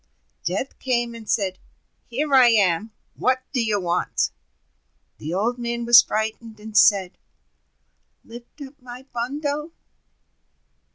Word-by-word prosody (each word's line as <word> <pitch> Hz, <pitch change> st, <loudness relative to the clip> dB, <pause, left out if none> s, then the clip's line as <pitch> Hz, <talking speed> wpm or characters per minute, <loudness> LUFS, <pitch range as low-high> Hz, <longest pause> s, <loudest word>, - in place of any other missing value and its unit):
Death 200 Hz, +10 st, -3 dB
came, 240 Hz, -2 st, -1 dB
and 230 Hz, -2 st, -11 dB
said: 190 Hz, -3 st, 0 dB, 0.5 s
"Here 280 Hz, +4 st, -2 dB
I 260 Hz, -2 st, +7 dB
am, 210 Hz, -2 st, +2 dB, 0.2 s
what 255 Hz, 0 st, 0 dB
do 250 Hz, -4 st, +1 dB
you 215 Hz, -2 st, 0 dB
want?" 175 Hz, -1 st, -1 dB, 0.9 s
The 155 Hz, -, -6 dB
Old 225 Hz, +7 st, -1 dB
Man 235 Hz, 0 st, -3 dB
was 240 Hz, 0 st, +9 dB
frightened, 220 Hz, 0 st, -4 dB
and 215 Hz, 0 st, -10 dB
said: 200 Hz, -3 st, +4 dB, 1.1 s
"Lift 235 Hz, +5 st, -13 dB
up 280 Hz, +2 st, -13 dB
my 250 Hz, +1 st, -10 dB
bundle!" 290 Hz, +6 st, -3 dB
235 Hz, 120 wpm, -23 LUFS, 210-255 Hz, 1.1 s, was